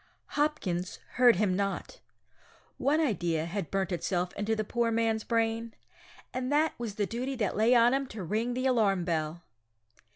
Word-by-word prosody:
Hopkins 195 - -1
heard 245 -3 +5
him 190 -1 +1
not. 195 0 -3 0.8
One 295 +3 +2
idea 175 - 0
had 175 0 -4
burnt 195 -1 -1
itself 180 0 -1
into 215 +2 -1
the 215 - -1
poor 235 +2 0
man's 225 -1 +1
brain, 230 0 -1 0.6
and 255 +1 -2
that 305 +2 +3
was 225 -4 -4
the 210 - 0
duty 250 +6 -3
that 215 -6 -1
lay 225 +4 +4
on 240 +1 +5
him 275 0 0
to 215 -5 -7
ring 225 +7 -1
the 255 +1 -1
alarm 205 -8 +2
bell! 165 0 -2
220 Hz, 165 wpm, -29 LUFS, 190-245 Hz, 0.8 s, heard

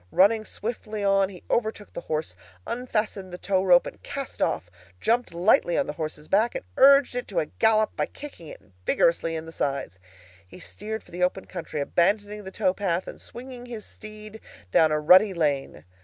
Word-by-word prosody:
Running 215 +3 +4
swiftly 215 -1 -5
on 195 -1 +3
he 180 -3 -12
overtook 220 -2 -2
the - - -5
horse, 155 - -3 0.3
unfastened 215 -6 -2
the 180 - -6
towrope 185 -2 +3
and - - -9
cast 275 -2 -6
off, - - 0 0.3
jumped 235 - +1
lightly 175 0 +3
on - - +2
the 150 - -4
horse's 155 -1 -5
back, 220 +5 +2
and - - -4
urged 275 0 +6
it 245 0 -4
to 195 - -7
a 160 - +2
gallop 215 +4 +2
by - - -1
kicking 280 - -10
it - - -10 0.2
vigorously 165 - +2
in 160 0 -5
the 165 - -9
sides. 135 - -3 0.5
He 135 - -13
steered 220 +4 -6
for - - -20
the 175 +1 -6
open 180 +1 0
country, 155 -2 -5
abandoning 205 +7 +1
the - - -5
tow 185 - +1
path, 185 -2 -1
and - - -9
swinging 245 0 -9
his 230 -3 -7
steed 215 0 -11 0.3
down 160 +6 +5
a 155 - +2
rutty 185 +6 +6
lane. 140 - -1
195 Hz, 185 wpm, -26 LUFS, 165-220 Hz, 0.5 s, urged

